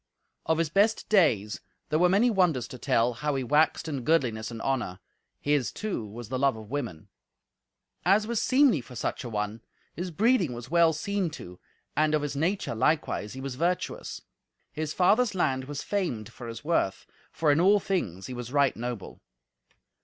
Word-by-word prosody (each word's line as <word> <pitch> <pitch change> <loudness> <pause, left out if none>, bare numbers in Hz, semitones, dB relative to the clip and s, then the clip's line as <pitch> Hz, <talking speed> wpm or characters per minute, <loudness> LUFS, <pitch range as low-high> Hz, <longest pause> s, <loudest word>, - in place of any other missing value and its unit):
Of 160 - +2
his 165 -2 0
best 205 +4 +2
days 115 - +3 0.3
there 155 - +2
were 180 +1 +5
many 215 +6 +4
wonders 170 - +2
to 125 - -9
tell, 115 +2 +2
how 150 +4 -2
he 135 - -1
waxed 150 +5 +2
in 140 -4 -3
goodliness 120 -7 +1
and 115 -1 -7
honour; 125 -9 -1 0.4
his, 145 -4 +1
too, 200 - -4
was 115 +2 -9
the 130 0 -2
love 140 -2 +3
of 110 +1 -11
women. 120 - -4 1.0
As 200 +4 +4
was 230 -1 -1
seemly 255 - +4
for 125 +1 -13
such 120 - -3
an 120 - -5
one, 105 0 -3 0.3
his 180 +2 -4
breeding 195 - +2
was 120 +3 -8
well 170 -1 +5
seen 190 +3 -1
to, 90 -7 -11 0.4
and 155 0 +3
of 150 - 0
his 145 -1 -3
nature, 175 +2 0
likewise, 125 -3 0
he 130 - -7
was 135 -1 -4
virtuous. 170 +7 -2 0.5
His 155 -1 -3
father's 205 +5 +3
land 130 -7 0
was 145 +1 -5
famed 170 - -2
for 120 - -9
his 115 +2 -7
worth, 150 - 0 0.3
for 155 -2 +2
in 150 +3 +3
all 200 +3 +5
things 100 - -2
he 130 - -6
was 125 -1 -6
right 140 -1 +3
noble. 120 -4 -6
145 Hz, 185 wpm, -28 LUFS, 120-180 Hz, 1.0 s, were